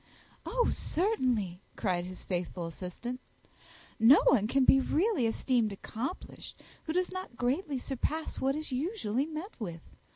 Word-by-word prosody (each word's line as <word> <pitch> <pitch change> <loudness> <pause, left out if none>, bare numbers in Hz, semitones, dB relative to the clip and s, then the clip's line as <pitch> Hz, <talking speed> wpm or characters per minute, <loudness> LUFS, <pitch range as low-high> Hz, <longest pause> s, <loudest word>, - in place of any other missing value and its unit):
"Oh, - - +2
certainly," 250 - 0
cried 180 -3 0
his 185 0 -9
faithful 175 -1 -2
assistant, 185 +9 -6 0.8
"no 230 +6 +8
one 215 -6 +5
can 265 +2 +3
be 270 - +7
really 320 - +2
esteemed 230 -1 +1
accomplished 230 - -6 0.3
who 315 - -2
does 365 +1 +1
not 370 -10 -6
greatly 275 +4 0
surpass 280 +5 -3
what 270 +1 +2
is 310 -1 -5
usually 275 - -1
met 320 +6 -6
with. 170 -7 -5
255 Hz, 135 wpm, -31 LUFS, 210-315 Hz, 0.8 s, no